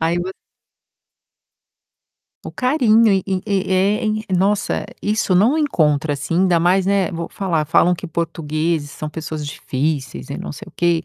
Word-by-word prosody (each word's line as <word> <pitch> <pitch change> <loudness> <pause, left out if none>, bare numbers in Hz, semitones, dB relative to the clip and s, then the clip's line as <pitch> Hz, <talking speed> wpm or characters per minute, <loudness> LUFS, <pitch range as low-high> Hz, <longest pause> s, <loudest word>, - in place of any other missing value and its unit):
Aí 165 +2 +1
vo 185 +2 -3 2.1
O - - -6
carinho 230 -5 +3
e 190 -2 +2
e 190 -1 -1
e 190 -2 0
é, 200 +5 +2
em 215 0 0
nossa, 195 +3 +1 0.2
isso 210 -2 0
não 215 - +4
encontra 155 - +1
assim, 140 +4 -4
ainda 180 -3 +3
mais, 180 +3 +3
né, 195 -2 +2
vou 170 0 -4
falar, 170 -6 -1
falam 170 +3 +3
que 175 - -10
portugueses 160 -2 -2
são 155 - -6
pessoas 155 -1 -5
difíceis 135 - -3
e - - -4
não - - -6
sei - - -9
o - - -14
quê. 170 -1 +1
175 Hz, 165 wpm, -20 LUFS, 160-200 Hz, 2.1 s, não